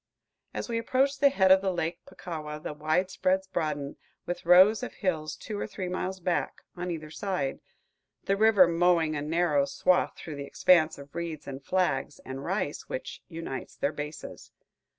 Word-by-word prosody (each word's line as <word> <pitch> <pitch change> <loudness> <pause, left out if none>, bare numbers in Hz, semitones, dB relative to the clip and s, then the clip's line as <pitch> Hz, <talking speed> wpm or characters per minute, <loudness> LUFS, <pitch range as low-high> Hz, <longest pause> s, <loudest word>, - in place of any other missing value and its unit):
As - - -4
we 230 -1 -1
approach 265 +4 +1
the 280 0 +6
head 190 -8 +3
of 190 0 +7
Lake 175 -3 -1
Puckawa, 155 -3 -6
the 155 - -5
widespreads 180 +5 0
broaden, 150 -6 -3 0.3
with 175 -1 -5
rows 190 +6 +7
of 250 - -5
hills 155 -6 -2
two 210 -2 -6
or - - -3
three 185 -2 -5
miles 185 +1 -3
back, 175 0 -2
on 180 0 -4
either 155 -3 -5
side, 180 -7 -2 0.6
the 195 - +1
river 205 -3 +6
mowing 170 -2 +2
a 145 - -2
narrow 155 -2 +2
swath 160 +6 +1
through 155 -3 -7
the 140 - -5
expanse 160 -1 +4
of 140 0 -12
reeds 165 -3 -5
and 135 0 -7
flags 150 -7 0
and 135 +1 -6
rice 185 -3 -3
which 130 - -5
unites 165 -6 -6
their 145 - -1
bases. 150 +1 -7
170 Hz, 170 wpm, -28 LUFS, 150-190 Hz, 0.6 s, of